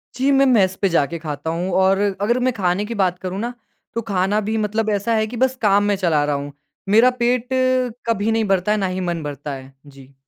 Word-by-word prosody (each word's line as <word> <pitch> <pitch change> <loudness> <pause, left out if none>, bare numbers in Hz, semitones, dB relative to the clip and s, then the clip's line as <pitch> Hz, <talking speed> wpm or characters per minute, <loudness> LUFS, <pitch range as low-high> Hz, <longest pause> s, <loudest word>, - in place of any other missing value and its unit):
जी, 270 +3 +1
मैं 275 0 +4
मेस 195 -7 +3
पे 195 - +3
जाके 165 -1 0
खाता 155 0 -5
हूँ 175 +3 -2
और 195 +1 +3 0.2
अगर 235 +4 +1
मैं 255 - +3
खाने 190 0 0
की 230 +1 -5
बात 180 -3 0
करूँ 185 +1 -5
ना, 240 +2 -3 0.4
तो 230 - -2
खाना 200 -1 0
भी 220 - 0
मतलब 215 +1 -1
ऐसा 210 +2 0
है 215 0 +1
कि 240 +2 -7
बस 260 +1 +1
काम 205 -1 +3
मैं 205 -1 +1
चला 165 -6 +1
रहा 145 -1 0
हूँ। 140 0 -5 0.4
मेरा 225 +5 +6
पेट 245 0 +1 0.6
कभी 220 0 +1
नहीं 225 -1 +1
भरता 195 +1 +1
है, 215 - +2
ना 195 -2 0
ही 185 0 -3
मन 170 -3 -3
भरता 145 0 -6
है। 135 0 -10
जी। 135 -1 -16
195 Hz, 235 wpm, -20 LUFS, 170-225 Hz, 0.6 s, मेरा